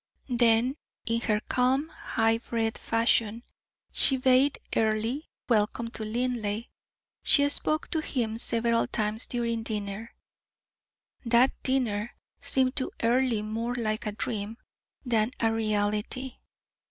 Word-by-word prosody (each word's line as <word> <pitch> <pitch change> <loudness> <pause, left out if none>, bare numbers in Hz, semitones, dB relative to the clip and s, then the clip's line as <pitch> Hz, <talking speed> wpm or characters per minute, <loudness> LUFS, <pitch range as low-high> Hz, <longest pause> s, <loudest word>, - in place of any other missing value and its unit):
Then 240 +2 +3 0.3
in 230 0 0
her 210 -3 +1
calm, 260 +6 +1
high 225 -5 0
bred 225 -2 -2
fashion 230 0 +1 0.5
she 265 - +3
bade 260 +2 +3 0.2
Earle 220 +4 +1 0.3
welcome 230 0 +1
to 220 - -6
Linleigh; 225 -1 -2 0.6
she 285 -1 +5
spoke 305 +1 0
to 325 - +1
him 230 -7 -2
several 230 0 +2
times 215 +1 -1
during 235 -2 -1
dinner. 210 0 -5 1.1
That 240 +2 +4
dinner 240 -5 -1 0.2
seemed 260 0 +2
to 260 - +1
Earle 235 -2 +2
more 225 +3 -3
like 215 -2 -2
a - - -1
dream 210 +1 -4 0.5
than 230 0 +1
a 225 -1 +2
reality. 215 +4 -1
230 Hz, 115 wpm, -28 LUFS, 220-250 Hz, 1.1 s, she